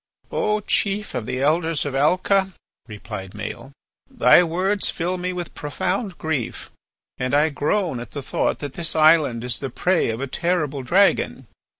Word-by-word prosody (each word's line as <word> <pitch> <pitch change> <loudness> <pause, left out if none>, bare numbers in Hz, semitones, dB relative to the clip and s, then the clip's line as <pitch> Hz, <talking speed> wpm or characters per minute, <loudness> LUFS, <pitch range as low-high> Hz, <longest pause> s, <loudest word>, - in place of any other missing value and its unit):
"O 210 0 0
chief 205 +1 -1
of 120 -4 -3
the 130 - -2
Elders 160 +1 +1
of 145 - -3
Alca," 185 +7 +2 0.3
replied 105 -3 -8
Maël, 110 +5 -7 0.4
"thy 250 -8 +6
words 185 +4 0
fill 180 +2 -2
me 180 +1 -2
with 175 -2 -6
profound 180 - -3
grief, 150 -7 -3 0.5
and 130 +2 0
I 150 +2 +4
groan 155 - -1
at 120 - -8
the 140 - -6
thought - - 0
that 140 - -7
this 165 +1 -1
island 155 -7 +4
is 125 -2 -2
the 135 - -4
prey 180 +6 +1
of 115 0 -3
a 135 - -2
terrible 150 -1 -1
dragon. 190 +10 +2
160 Hz, 165 wpm, -22 LUFS, 135-185 Hz, 0.5 s, thy